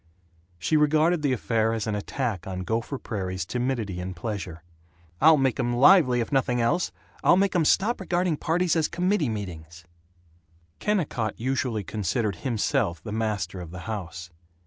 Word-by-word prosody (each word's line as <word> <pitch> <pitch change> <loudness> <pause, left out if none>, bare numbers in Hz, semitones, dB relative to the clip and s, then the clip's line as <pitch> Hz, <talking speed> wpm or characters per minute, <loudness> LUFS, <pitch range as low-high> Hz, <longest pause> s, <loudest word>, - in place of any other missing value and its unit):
She 85 - +1
regarded 155 +3 +3
the 145 -2 +1
affair 115 -2 +1
as 110 -2 -2
an 110 - -2
attack 105 -1 -3
on 95 -1 -4
Gopher 115 +8 -2
Prairie's 95 -7 -4
timidity 120 -4 -2
in 90 +1 -5
pleasure. 90 -3 -5 0.6
"I'll 160 0 +7
make 135 -3 +1
'em 120 0 0
lively, 130 -2 +6
if 115 - -4
nothing 125 -3 +1
else. 120 +10 +1 0.3
I'll 175 - +6
make 195 -1 +2
'em 170 -3 +3
stop 210 +8 +2
regarding 175 -3 0
parties 170 +2 +1
as 160 -2 +2
committee 180 - 0
meetings." 85 -6 -7 0.9
Kennicott 150 - -1
usually 125 -3 -1
considered 105 0 -2
himself 105 - -1
the 105 - -6
master 105 -5 -2
of 85 - -8
the 90 +2 -8
house. 90 -4 -6
115 Hz, 155 wpm, -26 LUFS, 95-150 Hz, 0.9 s, I'll